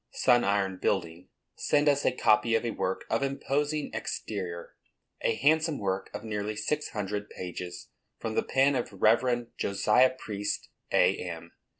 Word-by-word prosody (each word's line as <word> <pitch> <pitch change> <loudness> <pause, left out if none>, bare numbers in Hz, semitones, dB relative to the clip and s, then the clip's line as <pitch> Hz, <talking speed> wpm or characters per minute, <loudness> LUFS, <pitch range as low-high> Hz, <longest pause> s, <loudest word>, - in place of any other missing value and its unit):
Sun 120 -1 +3
Iron 100 -2 +1
Building, 90 -2 -2 0.3
send 145 0 +2
us 145 -1 +3
a - - +4
copy 115 -1 +3
of 115 - 0
a 115 - 0
work 95 - -2
of 115 - +2
imposing 145 +2 -1
exterior, 90 -5 -5 0.5
a 115 - +1
handsome 155 +3 +2
work 95 -1 -2
of - - -7
nearly 105 -1 -3
six 150 +7 -2
hundred 105 0 -4
pages, 90 -1 -7 0.3
from 110 - -4
the - - +2
pen 135 +2 +3
of 125 -3 -2
Rev. 120 +4 +2
Josiah 125 +6 +3
Priest, 105 -3 -4 0.2
A.M. 85 -2 +1
110 Hz, 145 wpm, -29 LUFS, 95-130 Hz, 0.5 s, a